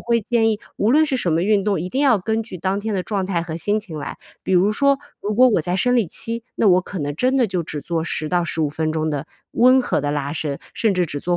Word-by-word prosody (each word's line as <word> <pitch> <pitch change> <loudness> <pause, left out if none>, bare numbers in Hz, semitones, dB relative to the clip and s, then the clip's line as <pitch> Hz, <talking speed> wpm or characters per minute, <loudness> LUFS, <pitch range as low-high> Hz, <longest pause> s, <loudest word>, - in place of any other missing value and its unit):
会 235 -1 0
建 225 +1 +2
议 215 - -1 0.2
无 215 - +2
论 310 +4 +5
是 275 -4 -1
什 175 - 0
么 165 - +1
运 205 0 +2
动， 200 -4 0
一 180 +3 -4
定 265 - -1
要 275 -5 +5
根 220 +3 -1
据 215 -4 -8
当 190 +3 -1
天 215 0 -3
的 185 - -1
状 195 -1 -2
态 175 -3 -1
和 165 -1 -6
心 205 +5 +1
情 175 -8 -8
来。 - - -6 0.3
比 190 - 0
如 190 +4 +4
说， 280 +4 +3 0.2
如 210 +1 -2
果 255 +3 +6
我 210 - +2
在 175 +3 -2
生 245 +6 +2
理 225 -6 +2
期， 230 +7 -3
那 - - +1
我 185 -2 +5
可 185 +1 -7
能 145 -2 -3
真 255 - +1
的 250 -4 +3
就 180 -3 -2
只 150 -2 -6
做 165 -2 -2
10 155 -1 -3
到 175 -1 +2
15 160 -3 -1
分 155 +1 -2
钟 155 0 -1
的 145 0 -3 0.2
温 255 +2 +5
和 - - 0
的 145 0 -2
拉 145 -1 -2
伸， 150 -3 -3
甚 220 -4 +1
至 180 -1 +2
只 145 -3 -5
做 175 +3 0
190 Hz, 295 characters per minute, -21 LUFS, 165-225 Hz, 0.3 s, 果